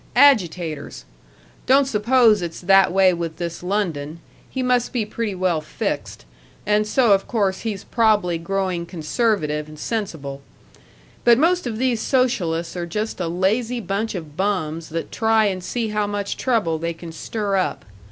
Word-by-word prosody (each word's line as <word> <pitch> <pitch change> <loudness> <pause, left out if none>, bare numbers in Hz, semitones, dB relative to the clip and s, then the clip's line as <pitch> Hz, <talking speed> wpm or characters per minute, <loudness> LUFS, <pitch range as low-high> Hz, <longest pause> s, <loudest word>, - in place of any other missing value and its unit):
Agitators! 180 - +2 0.6
Don't 275 +2 +5
suppose 230 -2 +3
it's 170 -1 -5
that 195 +1 +5
way 190 0 +4
with 165 -2 -4
this 170 -1 -5
London 170 -5 -2 0.3
he 260 - -3
must 250 -1 +1
be 240 -5 -1
pretty 215 -1 -3
well 180 -4 0
fixed, 105 - -4 0.4
and 210 +1 +2
so 235 0 +3
of 195 0 +3
course 200 -5 0
he's 210 -4 -4
prob'ly 210 -7 +2
growing 185 0 -2
conservative 155 -3 -1
and 155 0 -12
sensible. 150 -10 -4 0.8
But 235 -1 +6
most 345 +1 +2
of 220 -2 -3
these 245 -2 0
socialists 185 -13 0
are 175 -1 -3
just 210 +5 -3
a 175 - -1
lazy 215 +8 0
bunch 210 0 -2
of 155 -5 -7
bums 165 -4 -2
that 165 +1 -4
try 220 -1 +3
and 185 -3 -1
see 230 +2 -2
how 210 -1 0
much 205 -1 -3
trouble 210 -11 0
they 170 +1 -2
can 165 0 -9
stir 200 +4 -2
up. 185 - -1
195 Hz, 160 wpm, -22 LUFS, 170-225 Hz, 0.8 s, But